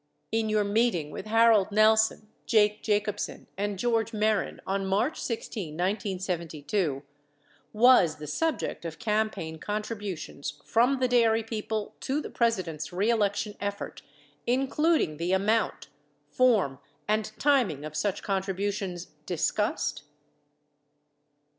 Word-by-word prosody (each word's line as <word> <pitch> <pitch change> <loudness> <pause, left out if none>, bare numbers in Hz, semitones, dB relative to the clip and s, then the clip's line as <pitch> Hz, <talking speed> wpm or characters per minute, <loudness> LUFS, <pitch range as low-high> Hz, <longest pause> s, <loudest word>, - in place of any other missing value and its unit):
In 225 -1 0
your 215 -1 +2
meeting 200 -7 +1
with - - -7
Harold 225 -2 +4
Nelson, 215 0 +4 0.2
Jake 210 -2 +3
Jacobsen 210 -1 -1
and 205 0 -2
George 230 +1 0
Mehren 215 -1 0
on 195 +1 -1
March 210 +10 0
16, 210 -8 -4
1972, 180 - -2 0.7
was 215 -8 +5
the 150 - -9
subject 275 - -2
of 165 -1 -6
campaign 215 -8 -1
contributions 205 -9 -5
from 245 +4 +3
the 255 0 +1
dairy 230 -2 +3
people 220 -1 -4
to 275 +3 -1
the - - -6
Presi 230 -5 +1
dent's 160 -1 -6
reelection 205 +1 0
effort, 200 0 -4 0.5
including 270 - +2
the 170 +3 -1
amount, 215 +4 +1 0.4
form 210 - +3 0.3
and 215 0 +1
tim 275 -6 +3
ing 145 -1 -6
of 155 0 -7
such 195 +5 -1
contributions, 195 -2 -2 0.2
discussed 175 -3 -1
210 Hz, 115 wpm, -28 LUFS, 185-225 Hz, 0.7 s, was